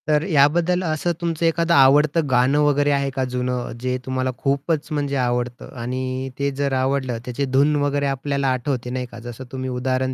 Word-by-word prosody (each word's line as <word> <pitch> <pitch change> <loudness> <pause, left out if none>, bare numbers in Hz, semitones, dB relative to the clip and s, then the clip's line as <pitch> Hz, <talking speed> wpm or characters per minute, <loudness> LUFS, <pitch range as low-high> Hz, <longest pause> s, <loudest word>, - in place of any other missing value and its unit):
तर 150 0 +2
याबद्दल 170 +3 +3
असं 160 +1 -1
तुमचं 165 -1 -1
एखादं 165 +1 +2
आवडतं 150 +2 +5
गाणं 130 +3 +3
वगैरे 145 0 +2
आहे 140 -1 +1
का 135 - 0
जुनं 125 -1 -2
जे 125 0 -1
तुम्हाला 130 0 -1
खूपच 140 +3 -1
म्हणजे 145 -2 -1
आवडतं. 125 0 -2
आणि 130 +2 -3
ते 140 0 +1
जर 140 0 -2
आवडलं 130 -2 0
त्याचे 125 +3 -2
धून 140 +3 +2
वगैरे 145 0 0
आपल्याला 140 0 -1
आठवते 125 -1 -3
नाही 125 0 -3
का? 115 - -9
जसं 120 +2 -8
तुम्ही 130 0 -4
उदाहरण 130 +1 -1
135 Hz, 180 wpm, -22 LUFS, 130-145 Hz, -, आवडतं